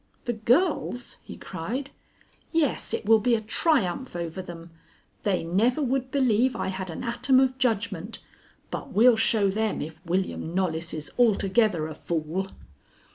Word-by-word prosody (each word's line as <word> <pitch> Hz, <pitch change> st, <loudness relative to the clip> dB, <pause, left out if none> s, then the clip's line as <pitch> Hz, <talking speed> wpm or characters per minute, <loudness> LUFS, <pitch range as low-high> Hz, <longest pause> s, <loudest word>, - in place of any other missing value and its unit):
"The 240 Hz, -, 0 dB
girls?" 245 Hz, -, +1 dB
he -, -, -10 dB
cried. 235 Hz, +11 st, -5 dB, 0.6 s
"Yes, 320 Hz, -4 st, 0 dB
it -, -, -2 dB
will 225 Hz, +1 st, +6 dB
be 235 Hz, +3 st, +3 dB
a -, -, 0 dB
triumph 230 Hz, -, 0 dB
over 170 Hz, +1 st, -4 dB
them. 170 Hz, -2 st, -10 dB, 0.5 s
They 195 Hz, -5 st, 0 dB
never 210 Hz, -, +2 dB
would 265 Hz, -2 st, 0 dB
believe 255 Hz, -2 st, +2 dB
I -, -, -2 dB
had 190 Hz, -1 st, -4 dB
an 165 Hz, -, -6 dB
atom 245 Hz, +2 st, +3 dB
of 260 Hz, 0 st, +1 dB
judgment. 220 Hz, -5 st, -1 dB, 0.5 s
But -, -, -5 dB
we'll 235 Hz, +3 st, +6 dB
show 215 Hz, -3 st, +2 dB
them, 220 Hz, +2 st, -1 dB
if 160 Hz, +3 st, -7 dB
William 180 Hz, -1 st, -2 dB
Knollys 170 Hz, -3 st, -1 dB
is 155 Hz, -1 st, -6 dB
altogether 210 Hz, -5 st, +3 dB
a 160 Hz, -, -6 dB
fool." 165 Hz, +4 st, -3 dB
215 Hz, 150 wpm, -26 LUFS, 175-250 Hz, 0.6 s, will